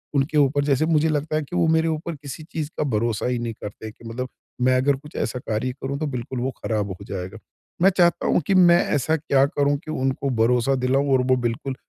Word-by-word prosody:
उनके 140 +2 +1
ऊपर 145 0 +3
जैसे 140 +1 +2
मुझे 160 -1 +2
लगता 155 0 -1
है 155 - +1
कि 160 - -8
वो 170 -2 +3
मेरे 160 0 +3
ऊपर 160 +1 -3
किसी 145 +2 -8
चीज़ 155 -2 -3
का - - +1
भरोसा 115 -4 -1
ही 125 -1 -1
नहीं 120 -1 -3
करते 110 +1 -7
कि 115 - -18
मतलब 125 +3 -4 0.3
मैं 130 +1 +4
अगर 140 +2 +2
कुछ 150 +3 -14
ऐसा 125 +1 -2
कार्य 115 +2 -2
करूँ 140 +1 -3
तो 155 - -1
बिल्कुल 125 -1 -4
वो 130 +2 -1
ख़राब 105 -3 -1
हो 95 - -7
जाएगा। 95 +2 -6 0.4
मैं 190 - +7
चाहता 175 -2 +3
हूँ - - +3
कि - - +3
मैं 175 -2 +6 0.2
ऐसा 145 +3 +1
क्या 140 -3 +3
करूँ 145 0 +1
कि 155 - -5
उनको 135 -1 -1
भरोसा 125 +3 +3
दिलाऊँ 135 +2 +1
और 130 - +4
वो - - +6
बिल्कुल 130 +3 -4
135 Hz, 230 wpm, -23 LUFS, 125-155 Hz, 0.4 s, मैं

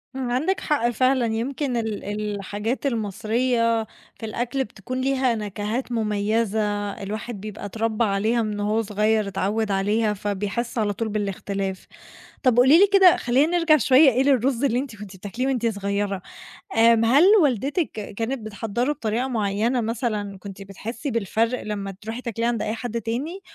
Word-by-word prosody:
عندِك 265 +9 0
حق 265 -6 +1
فعلًا، 255 +1 +2
يمكن 245 +3 -2
ال 220 -3 -3
الحاجات 210 +4 -3
المصرية 230 0 0 0.4
في 225 - -5
الأكل 240 +4 -2
بتكُون 255 +5 -6
ليها 260 -3 +1
نكهات 210 +4 -3
مميّزة، 210 -1 0
الواحد 215 +1 -5
بيبقى 210 -1 -7
اتربّى 225 +2 -1
عليها 215 +3 +1
من 210 -1 -3
وهو 210 +2 +1
صغيّر، 215 0 +1
اتعوّد 200 +2 -1
عليها، 210 +2 +1
فبيحس 205 +5 -3
على 205 -2 +1
طول 220 +2 -3
بالاختلاف. 195 -2 -3 0.6
طَب 250 -2 +3
قولي 270 +7 +7
لي 400 - +7
كده، 375 -3 +7
خلّينا 285 +8 +2
نرجَع 325 -2 +5
شوية 270 +2 +6
إيه، 255 +2 +2
للرز 265 -1 +2
اللي 250 -2 +2
أنتِ 265 -5 -5
كنتِ 205 -2 -10
بتاكليه 230 +8 -3
وأنتِ 250 -3 0
صغيّرة. 200 -2 -2 0.6
آمم، 230 0 +5
هل 265 +7 +5 0.2
والدتِك 285 - 0
ك 210 -2 -7
كانت 235 +5 -2
بتحضّره 225 +6 -2
بطريقة 240 -1 -2
معيّنة 225 +2 0
مثلًا 215 -4 -2
كنتِ 195 +1 -9
بتحسي 225 +7 -6
بالفرْق 230 +2 0
لما 200 -2 -4
ترُوحي 225 +3 -5
تاكليه 230 -1 -2
عند 235 -2 0
أي 215 - -2
حد 230 0 -4
تاني، 280 +12 -4
225 Hz, 155 wpm, -23 LUFS, 205-250 Hz, 0.6 s, قولي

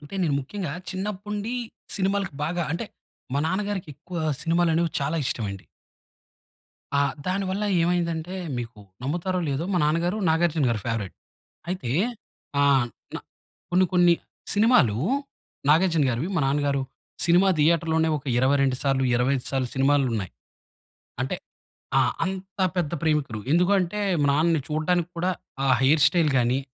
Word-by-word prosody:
అంటే 145 +6 -11
నేను 150 -5 +1
ముఖ్యంగా 175 +2 -5 0.2
చిన్నప్పుండి 205 +4 -4 0.4
సినిమాలకి 195 -3 0
బాగా, 175 +2 -1
అంటే 175 +7 -3 0.5
మా 140 - +2
నాన్నగారికి 195 -3 -2
ఎక్కువ 175 +5 -9 0.3
సినిమాలు 170 0 +2
అనేవి 165 -1 +1
చాలా 145 +4 -1
ఇష్టం 115 - -2
అండి. 100 -1 -8 1.3
ఆ! - - +4 0.3
దాని 195 +2 0
వల్ల 200 +3 -1 0.2
ఏమైందంటే, 170 0 -1 0.2
మీకు 120 -2 -6 0.2
నమ్ముతారో 175 +6 -1
లేదో 140 +4 -1
మా 180 - +2
నాన్నగారు 170 +6 +1
'నాగార్జునగారి' 160 -9 +2
ఫేవరైట్. 115 -5 -2 0.6
అయితే 140 -11 -3 0.7
ఆ! - - +4 0.5
నా - - -4 0.5
కొన్ని, 185 +1 +4
కొన్ని 175 -1 +5 0.4
సినిమాలు 205 - +4 0.7
'నాగార్జునగారివి' 155 -3 +3
మా 165 - +2
నాన్నగారు 140 -1 +1 0.4
సినిమా 175 +3 +5
థియేటర్‌లోనే 160 +1 +3
ఒక 130 - -16
22 135 0 +3
సార్లు, 135 -1 +1
25 125 +1 +1
సార్లు 130 -2 -1
సినిమాలున్నాయి. 130 - +1 0.9
అంటే - - -2 0.6
ఆ! - - +5 0.2
అంత 190 +2 -6 0.2
పెద్ద 170 -4 0
ప్రేమికులు. 150 -8 0
ఎందుకు 180 +4 +3
అంటే, 185 +4 -2 0.2
మా 145 - +3
నాన్నని 160 +1 +2
చూడడానికి 170 +3 0
కూడా 180 +2 +1 0.3
ఆ - - +1 0.2
హెయిర్ 145 +3 +4
స్టైల్ 165 -2 +2
గానీ, 125 +2 +2
165 Hz, 130 wpm, -25 LUFS, 140-180 Hz, 1.3 s, కొన్ని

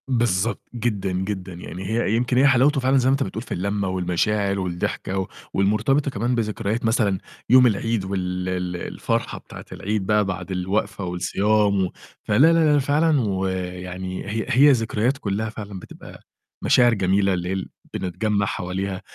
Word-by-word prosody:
بالضبط، 115 -4 +1
جدًا، 105 -5 -1
جدًا. 95 0 -3
يعني 90 +2 -8
هي 110 +1 0
يمكن 125 +1 +1
هي 135 +3 +6
حلاوته 135 +2 +4
فعلًا 130 +1 +3
زي 130 0 +3
ما - - +4
أنت 135 0 +2
بتقول 100 +3 -5
في - - -6
الّلمّة 100 +2 -1
والمشاعر 95 +2 0
والضحكة 90 +1 -3
و 95 - -2 0.3
والمرتبطة 110 +9 +2
كمان 120 +2 -1
بذكريات 110 0 -2
مثلًا 110 -4 +2 0.3
يوم 125 +1 +7
العيد 115 -1 0
وال 90 -1 -2
ال 90 -1 -2 0.2
الفرحة - - -2
بتاعة - - -11
العيد 105 -1 -2
بقى 105 +1 +3
بعد 95 -1 -4
الوقفة 100 +2 -1
والصيام 100 +3 +1
و 90 - -5 0.3
فلا، 105 - +1
لا، 160 +1 +5
لا، 145 - +4
فعلًا، 145 +1 +2
ويعني 95 -2 -3
هي 110 +2 -2
هي 135 +3 +6
ذكريات 115 +1 +1
كلّها 110 -2 -2
فعلًا 105 -3 -7
بتبقى - - -12 0.4
مشاعر 120 -1 +5
جميلة 95 -1 +2
اللي 90 -1 -2
هي - - 0
ال 95 -1 -4 0.2
بنتجمّع 100 +3 -1
حواليها، 95 0 -3
100 Hz, 165 wpm, -23 LUFS, 95-120 Hz, 0.4 s, يوم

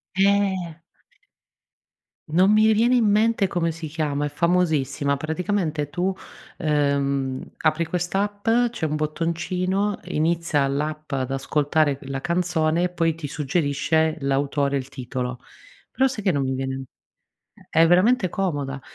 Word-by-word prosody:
Eh. 195 -3 +2 1.6
Non 185 +6 +4
mi 215 +1 +5
viene 230 +4 +3
in 240 - +3
mente 215 0 +3
come 170 -2 -1
si 165 0 -6
chiama, 150 -2 -2
è - - -2
famosissima. 145 -4 +1
Praticamente 160 -1 -2
tu, 180 +4 -1 0.5
uhm, 140 -3 0
apri 160 +1 +1
quest'app, 195 +5 -2 0.2
c'è 235 -8 -4
un 155 -1 -1
bottoncino, 180 +6 -1
inizia 165 -3 +1
l'app 150 +3 -3
ad 135 -1 -2
ascoltare 145 +1 +1
la 135 0 -5
canzone, 170 -1 +1
e 180 - +1
poi 165 -2 0
ti 165 -3 -6
suggerisce 150 +2 0
l'autore, 140 +1 0
il 130 -1 -5
titolo. 125 -2 -5 0.5
Però 265 - +2
sai 250 -6 -5
che 190 - +3
non 140 -3 0
mi 130 0 -1
viene 135 0 -3 0.9
è 165 +1 +4
veramente 185 +4 +4
comoda, 145 -8 -2
160 Hz, 130 wpm, -23 LUFS, 140-180 Hz, 1.6 s, mi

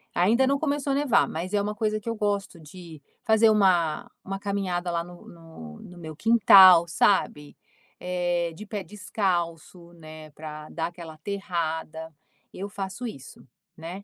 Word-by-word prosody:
Ainda 230 +9 +3
não 280 +1 +2
começou 285 -2 -1
a - - +1
nevar, 285 -3 +2
mas 180 +5 -5
é 205 - +2
uma 210 +1 -3
coisa 215 0 -1
que 230 - -7
eu 230 - -2
gosto 205 -4 -2
de 160 -1 -12 0.2
fazer 220 0 +5
uma 180 -7 +2
uma 195 0 -5
caminhada 190 -3 -2
lá 170 0 -1
no 175 0 -14
no 160 - -12
no 180 - -13
meu 160 -2 -9
quintal, 190 -4 +7
sabe, 155 -5 0 0.4
eh, 175 -2 -2
de 215 - -10
pé 205 -1 -5
descalço, 175 -4 -3
né, 155 -1 -12
pra 155 0 -9
dar 165 0 -3
aquela 170 -2 -10
aterrada. 160 -3 -4 0.4
Eu 200 +2 -6
faço 200 +5 -6
isso, 135 - -11 0.3
né. 175 +5 -8
180 Hz, 160 wpm, -25 LUFS, 165-205 Hz, 0.4 s, quintal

